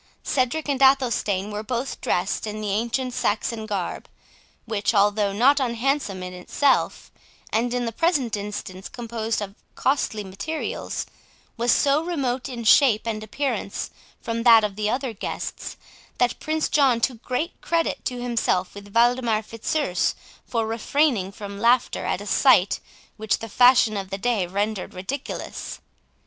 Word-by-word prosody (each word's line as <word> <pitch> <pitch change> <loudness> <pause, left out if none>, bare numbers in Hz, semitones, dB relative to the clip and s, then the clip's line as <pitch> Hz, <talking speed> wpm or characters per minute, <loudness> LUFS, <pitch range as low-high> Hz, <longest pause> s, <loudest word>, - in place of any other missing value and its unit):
Cedric 275 +4 0
and 275 -2 -1
Athelstane 235 -7 +3
were 210 0 -3
both 245 +4 -3
dressed - - -1
in 215 0 -4
the 210 -2 -2
ancient 240 +4 -1
Saxon 230 -2 -1
garb, 200 -5 -3 0.6
which, 220 -1 -1
although 205 0 +3
not 260 +8 +4
unhandsome 240 -5 -1
in 180 0 -6
itself, 260 +10 0 0.4
and 235 +2 +1
in 245 0 -1
the 230 - -2
present 280 -4 +1
instance 200 -2 -6
composed 230 -2 -3
of 195 -1 -7 0.2
costly 255 -6 0
materials, 200 +12 -4 0.5
was 235 0 +2
so 285 +5 +3
remote 275 -7 -2
in 240 -2 -5
shape 225 -1 +5
and 215 -2 -3
appearance 225 -3 -3 0.3
from 230 0 -3
that 230 -2 +7
of 205 -2 -2
the 210 0 -1
other 255 0 -1
guests, 205 - -5 0.4
that 245 -1 +1
Prince 310 0 -1
John 270 -5 +3
took 235 -1 -1
great 290 +9 -3
credit 335 -1 0
to 250 -1 -2
himself 235 -6 0
with 200 0 -12
Waldemar 235 -2 +3
Fitzurse 230 - -1 0.3
for 230 -2 0
refraining 225 -2 +1
from 200 0 -8
laughter 240 +3 +2
at - - -1
a - - -7
sight - - +4 0.4
which 215 -2 0
the 225 - -7
fashion 245 -1 +5
of 195 -1 -4
the 195 - -3
day 210 -3 0
rendered 200 +1 -2
ridiculous. 195 +10 -5
230 Hz, 150 wpm, -24 LUFS, 210-255 Hz, 0.6 s, that